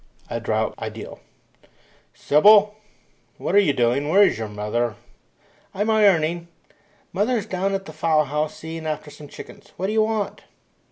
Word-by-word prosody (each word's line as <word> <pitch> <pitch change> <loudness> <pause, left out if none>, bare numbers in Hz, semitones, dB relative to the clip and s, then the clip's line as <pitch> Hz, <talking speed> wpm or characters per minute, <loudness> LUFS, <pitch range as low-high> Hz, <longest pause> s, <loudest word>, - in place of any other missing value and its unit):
A - - -2
DROUGHT - - -1
IDYLL - - -7 1.0
"Sybylla, 205 +7 +5 0.7
what - - -3
are 200 - +7
you 195 -8 +3
doing? 125 +3 0
Where 195 +5 +6
is 195 - +2
your 110 - -3
mother?" 105 +2 -2 0.8
"I'm 205 +3 0
ironing. 175 -6 +2 0.7
Mother's 215 +2 0
down 195 +1 -1
at 195 0 -5
the 155 - -10
fowl 155 -1 +2
house 150 +2 -3
seeing 160 0 -7
after 155 -1 -4
some 145 0 -12
chickens. - - -13
What 185 - -3
do 205 - -1
you 220 - +3
want?" 215 -2 -2
165 Hz, 155 wpm, -22 LUFS, 150-205 Hz, 1.0 s, are